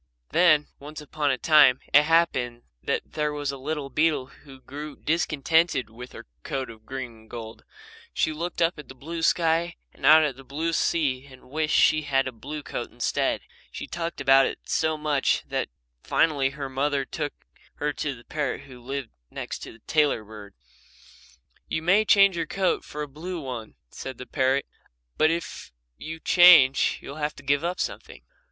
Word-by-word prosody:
Then, 155 -4 +4
once 150 +2 -9
upon 150 0 -2
a 130 - +1
time, 145 -2 +5
it 145 - +9
happened 140 -7 +1 0.2
that - - -1
there 150 -1 -2
was 145 -1 -3
a - - -6
little 145 0 -4
beetle 150 -1 +1
who 135 0 -16
grew 145 +3 -8
discontented 160 -4 +1
with 125 +2 -10
her - - -10 0.2
coat 130 - -4
of 110 -1 -17
green 130 -2 -5
and 110 -1 -19
gold. 115 -2 -8 0.5
She 155 - 0
looked 170 +2 -2
up 165 -1 0
at 150 - -10
the 130 - -11
blue 165 +6 -6
sky 170 +1 +2 0.2
and - - -20
out 155 +3 +8
at 140 -4 -1
the 135 - -12
blue 155 +6 -3
sea 140 -5 0
and 130 -1 -16
wished 155 +1 +1
that - - +6
she 155 - +1
had 135 -2 +1
a - - -3
blue 145 +6 -7
coat - - -5
instead. - - -1 0.3
She - - -6
talked 170 -1 -5
about 135 0 +5
it - - -6
so 155 -1 0
much 150 -2 +1
that - - -2 0.3
finally 145 -4 +2
her 140 -2 -4
mother 140 +1 -1
took 150 +1 -4 0.4
her 150 0 -2
to 140 -1 -3
the 120 - -15
parrot 145 -2 -3
who 130 -3 -13
lived 135 0 -5 0.2
next - - -6
to - - -9
the 110 - -18
tailor 150 -7 +2
bird. 105 -2 -12 1.1
"You 160 - -3
may 195 +6 +4
change 200 -3 +5
your 165 -2 -2
coat 190 +1 0
for 150 0 -6
a - - -6
blue 170 +6 -6
one," 125 -6 -7 0.2
said 130 -2 -7
the 125 - -8
parrot, 135 0 +1 0.5
"but 155 - +4
if 170 +1 -4 0.2
you 160 - -7
change 165 -7 +6
you'll 140 - -8
have 150 0 -2
to 140 - -13
give 140 +2 +1
up 175 +1 -2
something." - - -5
145 Hz, 185 wpm, -25 LUFS, 130-160 Hz, 1.1 s, it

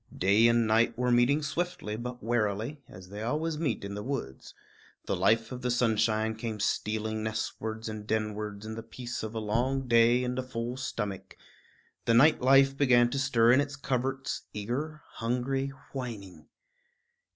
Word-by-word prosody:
Day 100 +5 +5
and 115 0 +3
night 110 +2 +2
were 125 0 +1
meeting 125 +5 +3
swiftly 165 -8 -3
but 125 +1 -6
warily, 115 +4 -1
as 90 0 -12
they 105 +2 -7
always 150 +6 -1
meet 135 -10 -1
in 100 - -5
the 105 - -4
woods. 115 - -5 0.5
The - - -1
life 110 +5 +2
of 125 -1 -6
the 125 - -1
sunshine 110 -2 +1
came 110 -1 -5
stealing 110 +1 -1
nestwards 110 0 -4
and 110 -1 -6
denwards 105 -1 -2
in 110 - -5
the 115 - -6
peace 120 +2 -6
of 110 +1 -6
a - - -1
long 125 +5 0
day 120 +1 +5
and 125 +1 -2
a - - +1
full 125 -1 -4
stomach; 100 -8 -5 0.7
the 115 - +3
night 145 +6 +6
life 135 +1 +5
began 120 -4 +4
to 140 - -1
stir 120 -4 +4
in 130 +3 +5
its 140 0 -4
coverts, 135 0 -2
eager, 135 +9 -4
hungry, 125 +4 -2 0.3
whining. 115 -8 -7
115 Hz, 165 wpm, -29 LUFS, 110-130 Hz, 0.7 s, night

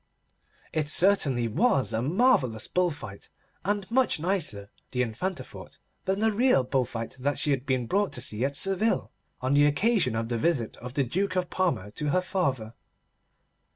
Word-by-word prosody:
It 155 -2 0
certainly 150 -10 +3
was 135 - +1
a 110 - 0
marvellous 140 - +2
bull 180 0 +1
fight, 105 -11 -9 0.3
and 205 +1 -1
much 255 -8 +2
nicer, 155 - -2 0.2
the 125 -1 0
Infanta 150 - -3
thought, - - -12 0.3
than 195 +2 0
the 220 0 +3
real 225 - +3
bull 130 0 0
fight 115 -1 -6
that 145 +3 -1
she 150 - +1
had 135 0 -1
been 130 -3 0
brought 200 - 0
to 125 - -5
see 110 -1 0
at 140 +1 -1
Seville, 195 +7 +1 0.3
on 130 +2 0
the 145 +1 +5
occasion 185 - +2
of 115 0 -2
the 120 -1 -2
visit 135 -7 0
of 125 +2 -9
the 140 - +2
Duke 190 +11 -1
of 180 -1 -1
Parma 170 - -1
to 150 +7 -3
her 185 +5 +2
father. 135 - -2
145 Hz, 180 wpm, -27 LUFS, 120-190 Hz, 0.3 s, the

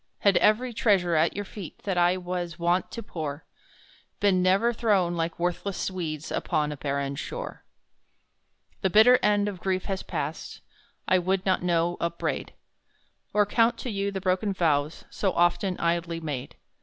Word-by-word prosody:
Had 200 -3 +4
every 240 +4 +3
treasure 195 -6 +2
at 160 +1 +2
your 205 - -3
feet 195 -4 -10
That 195 -2 -1
I 175 +1 +3
was 175 -2 -4
wont 175 +1 +1
to 230 - -7
pour, 155 -5 -5 0.7
Been 195 -3 +3
never 195 +6 +3
thrown 195 -6 +1
like 165 0 -2
worthless 180 +3 -2
weeds 160 -5 -4
Upon 150 -3 0
a - - -4
barren 140 0 -2
shore! - - -6 1.2
The 190 - +2
bitter 220 +6 +7
edge 205 -2 +2
of 195 -3 -4
grief 185 -1 -1
has 195 -2 -2
passed, - - -5 0.5
I 185 - +4
would 185 +1 0
not 190 -1 +2
now 175 0 +1
upbraid; 170 0 -3 0.8
Or 210 0 +3
count 230 +3 +2
to 250 - -5
you 200 -1 -1
the 195 -1 -4
broken 190 +2 0
vows, 155 -3 0
So 195 -3 -1
often 175 +2 +2
idly 170 0 0
made! 145 -6 -5
185 Hz, 160 wpm, -26 LUFS, 170-200 Hz, 1.2 s, bitter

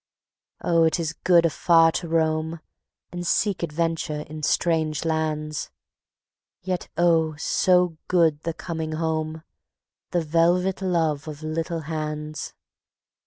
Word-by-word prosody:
Oh, 165 -1 +3
it 160 +1 +2
is 160 -1 -2
good 170 0 +4
afar 165 0 +4
to 170 - -3
roam, 160 0 0 0.5
And 175 -1 -5
seek 200 -1 +1
adventure 165 -2 -1
in 155 +1 -8
strange 160 -1 +1
lands; 155 -1 -2 0.9
Yet 180 -1 -3
oh, 165 -2 +3
so 180 +1 +2
good 165 -5 +3
the 165 0 -3
coming 160 -2 -4
home, 160 0 -2 0.7
The 175 - 0
velvet 175 +4 +2
love 165 -5 0
of 155 0 -7
little 165 +1 -2
hands. 155 0 -5
160 Hz, 120 wpm, -24 LUFS, 155-170 Hz, 0.9 s, good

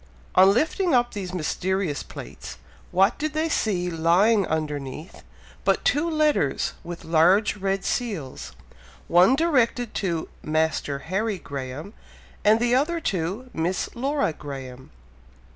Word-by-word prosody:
On 190 +1 +7
lifting 320 - +1
up 240 0 +2
these 190 -3 -5
mysterious 185 -1 -1
plates, - - -9 0.3
what 195 +5 +3
did 305 +1 -2
they 310 +1 0
see 190 - 0
lying 180 +6 +3
underneath, 150 0 -4 0.4
but - - +1
two 305 +4 +2
letters 305 - +1
with 170 0 -8
large 175 +7 +4
red 195 0 -1
seals, 195 - -3 0.5
one 180 +9 +5
directed 255 -7 +1
to 170 -5 -2
"Master 155 -2 0 0.2
Harry 210 0 0
Graham," 140 +5 -7 0.5
and 215 +2 +5
the 240 +1 +1
other 305 +7 +2
to 200 - -3
"Miss 175 +3 -2
Laura 275 - 0
Graham." 130 -3 -8
190 Hz, 125 wpm, -24 LUFS, 160-240 Hz, 0.5 s, On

